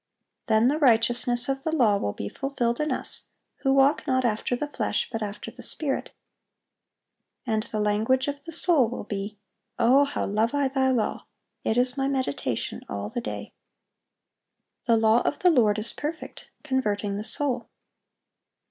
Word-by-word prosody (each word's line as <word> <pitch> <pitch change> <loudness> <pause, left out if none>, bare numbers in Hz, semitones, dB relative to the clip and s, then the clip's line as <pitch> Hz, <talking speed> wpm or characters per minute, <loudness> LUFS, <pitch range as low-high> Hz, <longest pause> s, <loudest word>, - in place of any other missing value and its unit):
Then 220 +1 +4
"the 295 +4 +1
righteousness 240 -1 +3
of 270 0 -1
the 320 - -2
law" 240 -10 +4
will 100 - -1
"be 100 - -5
fulfilled 245 - -2
in 305 0 0
us, - - -4 0.3
who 270 - +1
walk 275 +3 +3
not 260 -2 +2
after 225 +2 0
the 295 +4 -3
flesh, 290 - -1
but 225 -2 -3
after 205 0 -5
the - - -12
Spirit."(791) 270 -4 -7
And 215 - +2
the 215 - -4
language 220 +6 +2
of 285 0 -4
the 330 - -7
soul 330 -6 +3
will 245 - -5
be, 205 0 -5 0.4
"O 255 +4 +5
how 285 - -2
love 220 +6 0
I 280 -2 +2
Thy 265 -1 +2
law! 245 -4 -1 0.4
it 220 - 0
is 250 +1 +2
my 270 0 +1
meditation 255 - -2
all 100 0 -4
the 240 - -3
day."(792) - - -13
"The 230 -2 +4
law 220 +1 +4
of - - -1
the 360 - +4
Lord 220 -8 +4
is 215 +2 -2
perfect, 310 +2 -6
converting 210 -8 -1
the 210 - -4
soul." 250 -1 -2
245 Hz, 165 wpm, -26 LUFS, 220-275 Hz, 0.4 s, O